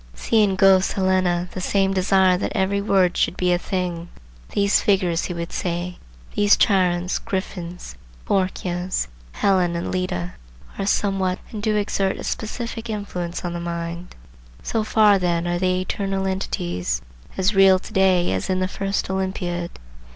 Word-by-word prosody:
See 225 -2 +2
in 200 -2 +2
Goethe's 190 0 +4
Helena 185 -2 +1
the 185 - -5
same 195 +1 +1
desire 190 -1 +3
that 180 - -3
every 200 +1 +1
word 190 -3 +2
should - - 0
be 180 -1 +1
a 175 - +1
thing. 175 -2 -3 0.4
These 200 0 +2
figures, 185 -5 +1
he 180 - -4
would 170 0 -5
say, 175 0 -3 0.3
these 205 0 +4
Chirons, 180 -2 +2
Griffins, 180 -2 -5 0.3
Phorkyas, 185 -1 -1 0.3
Helen 180 - +2
and 170 - -3
Leda, 90 - -2 0.5
are 195 - -1
somewhat, 195 -3 +1
and 215 - -5
do 215 0 +1
exert 200 -2 0
a - - -7
specific 230 +1 -4
influence 180 -5 -4
on 175 - -3
the 175 - -4
mind. 170 0 -5 0.5
So 225 -2 -1
far 215 -2 +4
then 175 -1 0
are 175 0 0
they 185 0 +1
eternal 195 +1 -2
entities, 90 - -2 0.3
as 190 +2 +2
real 195 -1 +6
to 195 - -11
day 190 -3 +3
as 95 0 -2
in 185 0 +1
the 185 - +1
first 195 +1 -2
Olympiad. 185 -2 -2
185 Hz, 160 wpm, -22 LUFS, 175-195 Hz, 0.5 s, real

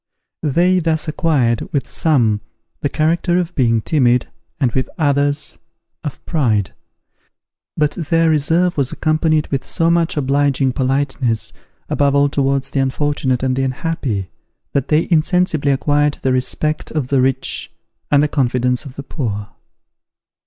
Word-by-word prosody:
They 175 +5 +2
thus 160 -2 0
acquired, 145 -8 0
with 140 - -1
some, 120 - +1 0.4
the 145 - -1
character 170 +4 +1
of 175 -1 -1
being 115 -6 +2
timid, 125 -3 +2 0.3
and 130 -5 +2
with 130 +1 -1
others, 145 -1 0 0.4
of 145 -4 -6
pride: 110 - 0 1.0
but 150 -1 +2
their 165 +1 +1
reserve 165 +4 +2
was 135 -3 0
accompanied 155 -1 +1
with 135 -2 -1
so 165 0 +1
much 170 -1 +1
obliging 140 -1 +1
politeness, 130 -3 0 0.3
above 140 -1 +1
all 140 0 +4
towards 140 -1 0
the 140 - 0
unfortunate 135 -1 0
and 130 -1 +1
the 135 - 0
unhappy, 130 - -2 0.4
that 140 -1 0
they 155 +2 +2
insensibly 160 -3 +2
acquired 145 +2 +1
the 130 - +2
respect 140 +4 -1
of 145 -5 -3
the 135 -2 +3
rich 130 0 -1 0.4
and 145 0 +4
the - - +3
confidence 125 -1 0
of 135 -2 -10
the 140 - -6
poor. 105 -8 -4
140 Hz, 140 wpm, -18 LUFS, 130-155 Hz, 1.0 s, all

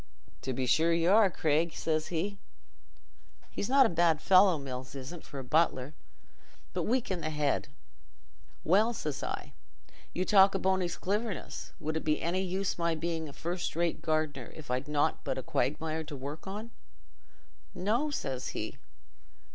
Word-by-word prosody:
'To 130 - -3
be 130 +1 -1
sure 160 +7 +3
y' 165 0 +2
are, 200 +2 +6
Craig,' 160 -1 +1
says 155 -1 0
he—he's 195 +3 -8
not 270 0 +7
a - - +3
bad 165 -2 +3
fellow, 185 -1 +6
Mills 130 -1 -6
isn't, 140 +5 -7
for 140 - -10
a 135 - -4
butler, 140 -1 +1 0.8
but - - -1
weak 245 -2 +1
i' - - +2
the 155 -2 -3
head. 150 -2 0 1.0
'Well,' 215 +7 +3
says 150 -8 -3
I, - - -5 0.6
'you 185 - -1
talk 195 -1 +6
o' - - +3
Bony's 185 -2 0
cliverness; 205 0 -3
would 155 +1 -3
it - - -4
be 150 -1 +1
any 175 +3 0
use 190 0 -2
my 170 -1 +1
being 160 -1 -3
a - - -11
first 175 +2 -3
rate 170 0 0
gardener 155 -5 -1
if 155 -4 -8
I'd 130 +2 -1
got 150 - -9
nought 150 +1 +1
but 135 - -2
a 130 - -3
quagmire 160 +1 -1
to 150 - -7
work 140 +6 -7
on?' 210 +4 -6 1.0
'No,' 235 +11 +1
says 135 - -3
he. - - -5
165 Hz, 165 wpm, -31 LUFS, 150-190 Hz, 1.0 s, not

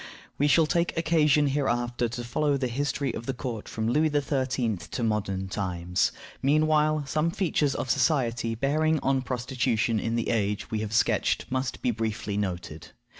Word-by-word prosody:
We 145 - +3
shall 160 +2 +5
take 170 +2 0
occasion 155 -3 +3
hereafter 120 -4 0
to 120 +1 -5
follow 140 +4 0
the 130 -2 -1
history 140 +2 -1
of 115 - -6
the 135 - -2
court 120 -5 -5
from 110 0 -2
Louis 150 +6 +3
XIII. 130 -6 0
to 85 +8 -5
modern 100 -3 -1
times. 90 -2 -1 0.3
Meanwhile, 155 +1 +3
some 155 +4 0
features 165 -6 0
of 130 - -1
society 125 -5 +1
bearing 155 +5 +1
on 135 0 +1
prostitution 125 -3 0
in 115 +2 -1
the 115 - -1
age 105 -3 -1
we 110 - -1
have 110 0 -4
sketched 115 - +2
must 130 0 -2
be 125 - +2
briefly 110 -2 -3
noted. 90 -6 -4
125 Hz, 165 wpm, -27 LUFS, 110-145 Hz, 0.3 s, shall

